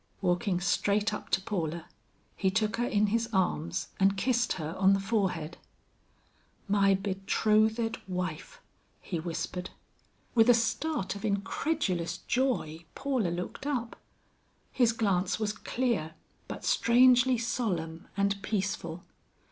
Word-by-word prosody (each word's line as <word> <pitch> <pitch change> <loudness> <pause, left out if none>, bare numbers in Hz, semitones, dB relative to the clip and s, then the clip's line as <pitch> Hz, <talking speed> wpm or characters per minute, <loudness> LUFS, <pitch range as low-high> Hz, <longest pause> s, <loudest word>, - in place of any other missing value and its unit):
Walking 180 0 +1
straight 205 +3 +1
up - - -6
to - - +2
Paula, 170 -5 -3 0.5
he 190 - +1
took 215 +3 0
her 240 +1 0
in 210 -1 +2
his 230 0 +1
arms 180 -3 0
and 195 0 +3
kissed 240 +3 +1
her 160 -2 -4
on 195 0 +5
the 195 - +2
forehead. 190 -6 -1 1.1
"My 195 -1 +4
betrothed 215 +4 +1
wife!" 180 0 -4 0.4
he 175 - -4
whispered. 180 +2 -4 0.6
With 225 0 +5
a 245 - +8
start 230 -1 -1
of 200 - -8
incredulous 200 - -1
joy, 235 - -1
Paula 260 -9 0
looked 180 +10 -5
up. 245 -5 -2 0.8
His 240 -3 +3
glance 195 -5 0
was 215 -1 -1
clear 225 -9 -2 0.3
but - - -7
strangely 250 +1 +5
solemn 185 -9 -2
and 200 0 +1
peaceful. 190 -5 -3
200 Hz, 125 wpm, -29 LUFS, 180-230 Hz, 1.1 s, a